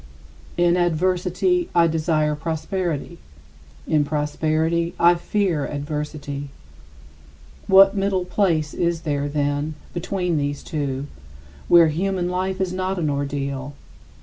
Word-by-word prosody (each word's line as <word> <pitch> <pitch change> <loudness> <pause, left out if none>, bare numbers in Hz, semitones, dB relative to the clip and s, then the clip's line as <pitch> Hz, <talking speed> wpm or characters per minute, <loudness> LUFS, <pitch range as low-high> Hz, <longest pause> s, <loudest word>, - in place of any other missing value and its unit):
In 175 0 +3
adversity, 180 +1 +1
I 170 -1 +6
desire 155 -2 +1
prosperity; 160 - -3 0.7
in 150 -1 +3
prosperity, 155 +3 0
I 175 +1 +6
fear 175 -3 -1
adversity. 145 -1 -5 1.2
What 195 0 +7
middle 195 -2 0
place 170 -5 0
is 170 -1 -1
there, 145 -3 -1
then, 145 +1 -1 0.2
between 180 -2 -1
these 145 0 -3
two, 140 -4 -3 0.6
where 170 -2 +7
human 180 +2 -1
life 185 +1 -2
is 185 -1 -1
not 185 +1 -2
an 155 -4 0
ordeal? 140 -1 -3
165 Hz, 110 wpm, -22 LUFS, 150-180 Hz, 1.2 s, What